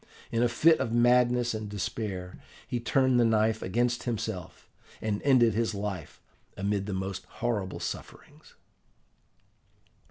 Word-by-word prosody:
In 115 - +1
a 120 - +3
fit 160 +7 +4
of 115 - -1
madness 120 0 +3
and 110 -1 -4
despair 100 -3 -4 0.3
he 120 - -2
turned 130 +1 +2
the - - +5
knife 110 -1 +2
against 120 +5 0
himself, 110 -7 -4 0.3
and 105 -2 -2
ended 125 -5 +4
his 115 0 0
life 100 -6 -5 0.4
amid 100 0 -1
the 100 - -3
most 95 0 -4
horrible 105 -6 -3
sufferings. - - -8
110 Hz, 130 wpm, -28 LUFS, 100-120 Hz, 0.4 s, the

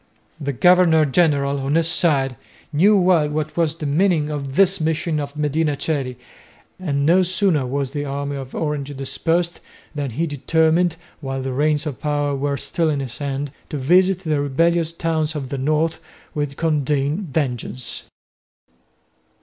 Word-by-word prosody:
The 140 0 -2
governor 170 +1 +5
general, 140 -2 +2
on 135 +2 -1
his 165 0 +3
side, 145 -7 +2 0.4
knew 200 +8 +5
well 175 -5 +3
what 155 0 -3
was 165 -2 +1
the 155 - -6
meaning 155 0 +2
of 140 -2 -4
this 195 -1 +3
mission 160 0 0
of 145 0 -6
Medina 150 0 0
Coeli, 135 -6 -2 0.6
and 140 -6 -1
no 175 +4 +5
sooner 185 -6 +1
was 135 0 -2
the 145 0 -3
army 140 0 -3
of 135 -1 -7
Orange 145 -3 -3
dispersed 165 +5 -1 0.3
than 145 -3 -3
he 155 +9 -1
determined, 160 +3 +1 0.2
while 135 -2 -4
the 130 -1 -3
reins 150 +2 +1
of 145 -5 -5
power 145 -1 0
were 140 +1 -1
still 155 +4 -1
in 145 -2 0
his 130 -3 -5
hands, 140 -1 -3 0.2
to 150 - -3
visit 180 +7 +3
the 155 -5 0
rebellious 165 +4 +1
towns 160 -2 -1
of 135 -4 -4
the 140 - -3
north 155 +4 0 0.3
with 145 -2 -3
condign 150 +2 0
vengeance. 125 -4 -3
150 Hz, 160 wpm, -21 LUFS, 140-165 Hz, 0.6 s, governor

